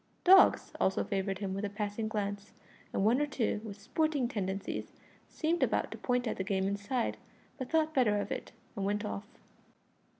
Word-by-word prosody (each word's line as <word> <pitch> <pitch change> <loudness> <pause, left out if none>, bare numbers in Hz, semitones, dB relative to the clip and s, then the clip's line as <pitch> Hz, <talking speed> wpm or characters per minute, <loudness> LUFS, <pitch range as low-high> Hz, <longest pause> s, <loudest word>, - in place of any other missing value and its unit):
Dogs 380 +1 +6
also 190 - +2
favoured 195 -1 -1
him 195 -1 -3
with 195 +2 -3
a 205 - -1
passing 210 +1 -3
glance, 205 -1 -3 0.4
and 195 - 0
one 240 +6 +4
or 295 - +1
two, 230 -6 -1
with 205 -2 -8
sporting 280 +4 0
tendencies, 195 -4 -3 0.4
seemed 335 +2 0
about - - +1
to - - -6
point 245 0 0
at - - -2
the 190 - -1
game 190 -1 0
inside, 200 +5 -1 0.4
but 260 - -4
thought 315 -1 +2
better 235 -7 +3
of - - -4
it, - - -4 0.2
and 200 - -3
went 205 +2 0
off. 205 0 -4
210 Hz, 185 wpm, -32 LUFS, 200-255 Hz, 0.4 s, Dogs